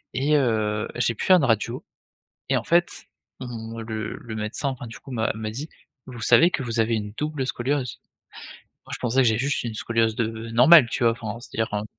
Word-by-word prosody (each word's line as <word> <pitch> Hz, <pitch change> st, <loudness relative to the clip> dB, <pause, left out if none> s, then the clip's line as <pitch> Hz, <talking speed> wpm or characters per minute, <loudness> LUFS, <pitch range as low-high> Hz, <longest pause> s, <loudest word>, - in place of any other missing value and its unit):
et 145 Hz, +3 st, +2 dB
heu, 110 Hz, -5 st, 0 dB
j'ai 120 Hz, -1 st, +1 dB
pu -, -, -5 dB
faire 185 Hz, -1 st, +7 dB
une 155 Hz, -, 0 dB
radio 115 Hz, -4 st, 0 dB, 0.7 s
et -, -, +3 dB
en -, -, -2 dB
fait, 170 Hz, +1 st, +3 dB, 0.5 s
mmh, 115 Hz, -2 st, -7 dB
le 110 Hz, -1 st, -5 dB
le 110 Hz, -2 st, -8 dB
médecin, 105 Hz, +6 st, -3 dB
enfin 125 Hz, -2 st, -6 dB
du 115 Hz, -, -10 dB
coup, 135 Hz, -, -12 dB
m'a 115 Hz, -3 st, 0 dB
m'a 110 Hz, 0 st, -4 dB
dit: 145 Hz, +8 st, -6 dB, 0.4 s
«Vous 125 Hz, -3 st, -9 dB
savez 170 Hz, +10 st, +5 dB
que -, -, -2 dB
vous 115 Hz, -1 st, -3 dB
avez 115 Hz, +1 st, +1 dB
une 105 Hz, -1 st, -4 dB
double 150 Hz, -3 st, -2 dB
scoliose?» 130 Hz, 0 st, -2 dB, 0.9 s
Moi -, -, -11 dB
je -, -, -7 dB
pensais 125 Hz, +1 st, -1 dB
que 120 Hz, -, +4 dB
j'ai 110 Hz, +1 st, +1 dB
juste 140 Hz, +3 st, -1 dB
une 115 Hz, -2 st, -4 dB
scoliose 115 Hz, -1 st, 0 dB
de 115 Hz, 0 st, -3 dB
normale 125 Hz, +3 st, +7 dB
tu -, -, -1 dB
vois? 115 Hz, -, +5 dB
Enfin 115 Hz, -1 st, -6 dB
c'est-à-dire, 115 Hz, -3 st, -4 dB
un 105 Hz, +1 st, -2 dB
115 Hz, 215 wpm, -24 LUFS, 110-130 Hz, 0.9 s, faire